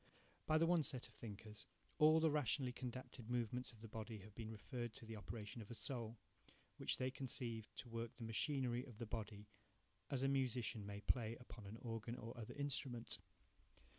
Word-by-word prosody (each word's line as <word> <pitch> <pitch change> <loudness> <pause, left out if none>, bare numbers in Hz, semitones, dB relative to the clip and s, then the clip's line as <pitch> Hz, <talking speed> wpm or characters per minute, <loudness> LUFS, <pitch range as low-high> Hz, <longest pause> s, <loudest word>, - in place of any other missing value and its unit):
By 155 - +6
the 165 - +6
one 170 -1 +6
set 135 -5 +1
of 120 - -19
thinkers 105 -1 -7 0.3
all 155 +1 +9
the 160 -1 +6
rationally 135 -2 +3
condapted 125 -2 -5
movements 125 +1 +1
of 110 -2 -15
the 115 - -6
body 110 +1 -4
have 105 +2 -11
been 110 0 -4
referred 120 +1 -3
to 115 - -7
the 110 0 -4
operation 105 +1 -4
of 105 - -8
a 120 - -4
soul, 115 -2 -1 0.6
which - - +2
they 130 0 +1
conceive 120 -4 -1
to 130 - -4
work 115 0 -3
the 120 - -6
machinery 125 +1 +2
of 120 -5 -10
the 115 - -2
body 105 -2 -3 0.6
as 135 -2 +1
a - - +6
musician 125 -6 +2
may 100 0 -4
play 115 0 +3
upon 115 -4 -8
an 105 +3 -5
organ 115 0 -2
or 115 +1 -5
other 115 -2 -5
instrument. 135 -4 0
120 Hz, 190 wpm, -44 LUFS, 110-130 Hz, 0.6 s, all